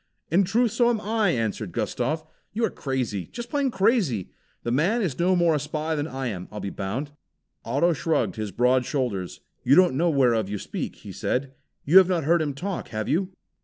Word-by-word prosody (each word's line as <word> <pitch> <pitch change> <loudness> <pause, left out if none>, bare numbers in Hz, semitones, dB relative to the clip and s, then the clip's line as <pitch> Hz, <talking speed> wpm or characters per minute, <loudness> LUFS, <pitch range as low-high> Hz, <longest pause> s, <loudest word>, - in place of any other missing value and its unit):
"In 185 +4 +4
truth, 225 +4 +2
so 240 +2 +3
am 235 -2 +1
I!" 215 -1 +1
answered 110 - -2
Gustav. 155 +6 -2 0.3
"You 225 +2 +1
are - - -2
crazy, 125 -9 -3
just 240 0 -7
plain 285 -2 +1
crazy. 195 - +1 0.3
The 120 - -2
man 185 - +2
is 145 -9 -2
no 185 +2 +3
more 170 -2 +3
a 150 - +1
spy 155 +2 -3
than 150 -1 -1
I 135 -1 -5
am, 95 -7 -4
I'll 105 - -6
be 100 - -4
bound!" 120 +10 -4 0.5
Otto 170 0 +2
shrugged 160 +1 0
his 110 -2 -3
broad 125 +5 +2
shoulders. 120 - -3 0.2
"You 130 +3 +5
don't 180 -5 +5
know 170 +5 +2
whereof 120 -8 +2
you 105 - -2
speak," - - -5
he - - -11
said. 135 +1 -2 0.3
"You 175 +7 +8
have 185 -1 +4
not 175 -4 +1
heard 165 +3 +3
him 145 -3 -2
talk, 190 +5 -4
have 110 -2 -4
you?" 180 +5 +1
150 Hz, 205 wpm, -25 LUFS, 120-185 Hz, 0.5 s, You